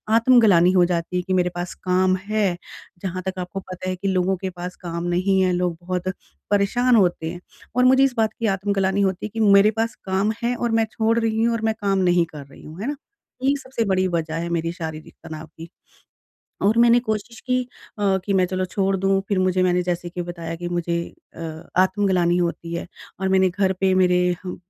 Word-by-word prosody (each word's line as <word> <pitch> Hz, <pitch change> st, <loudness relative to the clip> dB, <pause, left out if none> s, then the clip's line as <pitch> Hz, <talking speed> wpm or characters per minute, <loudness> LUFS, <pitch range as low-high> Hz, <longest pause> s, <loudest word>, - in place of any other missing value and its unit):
आत्मग्लानि 225 Hz, -7 st, +5 dB
हो 180 Hz, -2 st, +4 dB
जाती 175 Hz, 0 st, -2 dB
है 180 Hz, -, +1 dB
कि 185 Hz, +1 st, -3 dB
मेरे 180 Hz, -1 st, +2 dB
पास 175 Hz, 0 st, -4 dB
काम 185 Hz, 0 st, +2 dB
है। 205 Hz, -4 st, 0 dB, 0.4 s
जहाँ 185 Hz, -1 st, -4 dB
तक 190 Hz, 0 st, -3 dB
आपको 180 Hz, +2 st, -5 dB
पता 185 Hz, -1 st, -7 dB
है 185 Hz, -, -1 dB
कि 190 Hz, +2 st, -4 dB
लोगों 190 Hz, 0 st, +1 dB
के 190 Hz, +1 st, -4 dB
पास 180 Hz, 0 st, -7 dB
काम 170 Hz, -1 st, -4 dB
नहीं 185 Hz, +2 st, +1 dB
है 185 Hz, -1 st, +2 dB
लोग 175 Hz, -1 st, -1 dB
बहुत 180 Hz, +1 st, -3 dB, 0.4 s
परेशान 240 Hz, +5 st, +3 dB
होते 175 Hz, -5 st, +2 dB
हैं 175 Hz, 0 st, -9 dB, 0.3 s
और 250 Hz, 0 st, +4 dB
मुझे 260 Hz, +1 st, +6 dB
इस 270 Hz, -2 st, +2 dB
बात 220 Hz, -1 st, +1 dB
की 230 Hz, -, -1 dB
आत्मग्लानि 195 Hz, 0 st, 0 dB
होती 190 Hz, -1 st, 0 dB
है -, -, -4 dB
कि 225 Hz, -, -4 dB
मेरे 205 Hz, -1 st, +6 dB
पास 230 Hz, 0 st, -1 dB
काम 195 Hz, +2 st, +1 dB
है 240 Hz, +1 st, +1 dB
और 240 Hz, -1 st, -2 dB
मैं 225 Hz, -, +2 dB
छोड़ 225 Hz, +1 st, +1 dB
रही 225 Hz, -1 st, 0 dB
हूँ 235 Hz, 0 st, +2 dB
और 230 Hz, -, -2 dB
मैं 220 Hz, -, +2 dB
काम 200 Hz, -1 st, +1 dB
नहीं 175 Hz, -1 st, +3 dB
कर 150 Hz, -3 st, -10 dB
रही 135 Hz, -, -16 dB
हूँ। 155 Hz, +3 st, -11 dB
है 225 Hz, -, -3 dB
ना? 290 Hz, -, -2 dB, 0.5 s
यही 275 Hz, +2 st, +3 dB
सबसे 260 Hz, -4 st, -3 dB
बड़ी 190 Hz, -1 st, +1 dB
वज़ह 165 Hz, -2 st, -2 dB
है 170 Hz, -, -4 dB
मेरी 165 Hz, -1 st, -1 dB
शारीरिक 160 Hz, -2 st, -7 dB
तनाव 160 Hz, -1 st, -8 dB
की। 165 Hz, +1 st, -9 dB, 1.0 s
और 215 Hz, +3 st, +3 dB
मैंने 235 Hz, 0 st, +6 dB
कोशिश 220 Hz, +2 st, -3 dB
की 255 Hz, 0 st, +2 dB, 0.4 s
अ, 195 Hz, -2 st, +2 dB
कि 200 Hz, -, -1 dB
मैं 185 Hz, -1 st, +4 dB
चलो 185 Hz, +1 st, -2 dB
छोड़ 195 Hz, +2 st, 0 dB
दूँ 195 Hz, +1 st, +1 dB
फ़िर 200 Hz, -, +1 dB
मुझे 185 Hz, 0 st, +2 dB
मैंने 180 Hz, 0 st, +2 dB
जैसे 175 Hz, 0 st, -3 dB
कि 175 Hz, 0 st, -4 dB
बताया 170 Hz, -1 st, -6 dB
कि 175 Hz, +1 st, -5 dB
मुझे 175 Hz, -1 st, -2 dB, 0.4 s
अ, -, -, -9 dB, 0.4 s
आत्मग्लानि 185 Hz, -2 st, +2 dB
होती 170 Hz, -1 st, -2 dB
है 170 Hz, -, -4 dB, 0.3 s
और 190 Hz, -, 0 dB
मैंने 190 Hz, 0 st, +4 dB
घर 190 Hz, +1 st, +1 dB
पे 190 Hz, -1 st, +3 dB
मेरे 180 Hz, -1 st, +3 dB, 0.2 s
ह 180 Hz, -, -5 dB
185 Hz, 220 wpm, -22 LUFS, 175-205 Hz, 1.0 s, मुझे